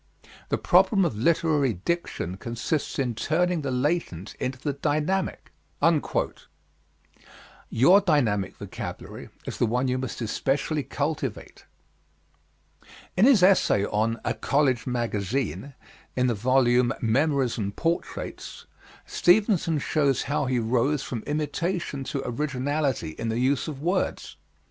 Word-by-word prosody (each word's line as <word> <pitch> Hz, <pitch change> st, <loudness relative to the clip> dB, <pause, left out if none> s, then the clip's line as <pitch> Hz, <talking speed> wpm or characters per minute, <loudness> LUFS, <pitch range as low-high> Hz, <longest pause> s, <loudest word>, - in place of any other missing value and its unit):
The -, -, +1 dB
problem 195 Hz, -5 st, +4 dB
of 155 Hz, -, -1 dB
literary 145 Hz, +1 st, +2 dB
diction 95 Hz, -, -3 dB
consists 120 Hz, +8 st, -3 dB
in 125 Hz, -3 st, 0 dB
turning 170 Hz, +7 st, 0 dB
the 140 Hz, -, -3 dB
latent 125 Hz, -, -1 dB
into 130 Hz, +1 st, -2 dB
the 145 Hz, +2 st, -3 dB
dynamic." 155 Hz, +7 st, -1 dB, 2.2 s
Your 175 Hz, -, +5 dB
dynamic 120 Hz, -, +1 dB
vocabulary -, -, -7 dB, 0.2 s
is -, -, -6 dB
the 120 Hz, -, +3 dB
one 125 Hz, +4 st, 0 dB
you 130 Hz, 0 st, 0 dB
must 130 Hz, -1 st, -5 dB
especially 135 Hz, +6 st, -1 dB
cultivate. 140 Hz, -4 st, -4 dB, 1.5 s
In 195 Hz, -, +5 dB
his 250 Hz, -9 st, +6 dB
essay 180 Hz, -, +4 dB
on 110 Hz, +3 st, 0 dB
"A -, -, +1 dB
College 135 Hz, -4 st, +1 dB
Magazine" 120 Hz, -, -2 dB, 0.4 s
in 125 Hz, -, +2 dB
the 125 Hz, -, +2 dB
volume, 125 Hz, +2 st, +3 dB
Memories 130 Hz, +1 st, +1 dB
and 100 Hz, -1 st, -3 dB
Portraits, 170 Hz, +5 st, -4 dB, 0.4 s
Stevenson 180 Hz, -4 st, +3 dB
shows 140 Hz, -2 st, +1 dB
how 145 Hz, +1 st, -1 dB
he 130 Hz, -1 st, +1 dB
rose 125 Hz, +5 st, +1 dB
from 115 Hz, -4 st, -4 dB
imitation 150 Hz, 0 st, -2 dB
to 135 Hz, 0 st, -3 dB
originality 140 Hz, -, -1 dB
in 115 Hz, -, -2 dB
the 110 Hz, -, -1 dB
use 130 Hz, +2 st, +1 dB
of 145 Hz, -2 st, -6 dB
words. 185 Hz, +3 st, -1 dB
135 Hz, 120 wpm, -26 LUFS, 120-155 Hz, 2.2 s, his